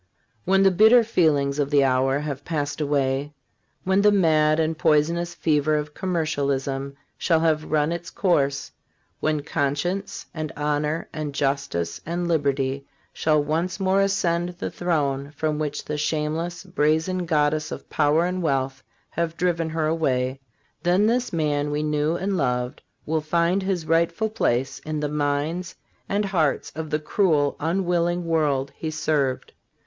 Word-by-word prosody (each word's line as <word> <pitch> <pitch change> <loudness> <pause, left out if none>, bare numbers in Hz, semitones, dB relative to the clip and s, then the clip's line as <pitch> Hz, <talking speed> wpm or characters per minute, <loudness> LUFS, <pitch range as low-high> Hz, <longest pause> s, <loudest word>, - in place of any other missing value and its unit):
When 195 +1 +4
the 195 - +5
bitter 220 +6 +6
feelings 150 -9 +2
of 140 -1 +1
the 145 -1 +4
hour 135 +1 +2
have 145 -2 -4
passed 145 -2 -3
away, 140 0 0 0.5
when 190 +1 +2
the 210 0 +5
mad 155 -5 +3
and 160 0 +1
poison 155 +1 +3
ous 170 0 -4
fever 155 -2 +1
of 150 0 -3
commercialism 140 -6 -2 0.2
shall 165 -3 +2
have 155 -2 +1
run 150 +1 +2
its 170 0 -4
course, 140 -7 0 0.5
when 155 -2 0
conscience 175 +12 -2
and 155 -2 -4
honor 150 +2 -1
and 150 -2 -4
justice 135 -13 -1
and 175 +1 -2
liberty 140 -4 0 0.3
shall 155 -2 +2
once 165 +6 -1
more 190 0 +2
ascend 175 -3 +1
the - - -4
throne 145 -5 -1
from 155 0 -1
which 145 -2 -3
the 150 0 -3
shameless, 160 +4 -2
brazen 175 0 0
goddess 150 -1 +1
of - - -7
power 155 +2 +2
and 180 +1 -2
wealth 135 -4 -1 0.3
have 165 0 -2
driven 170 -2 0
her 160 0 -1
away; 135 -5 0 0.4
then 180 +4 +3
this 245 +3 +1
man 150 -3 0
we 150 +1 -1
knew 150 +1 0
and 190 +2 -1
loved 125 -3 -1 0.2
will 160 0 0
find 170 +4 +1
his 190 -4 -2
rightful 170 +6 +1
place 130 - 0
in 155 -1 -4
the 150 - -1
minds 150 +4 -1 0.3
and 205 +1 +1
hearts 165 -7 0
of 155 0 -5
the 150 - +1
cruel, 155 -3 +1
unwil 175 +1 +1
ling 175 0 -1
world 145 -5 +1
he 160 - -4
served. 150 -4 -1
155 Hz, 155 wpm, -24 LUFS, 145-175 Hz, 0.5 s, bitter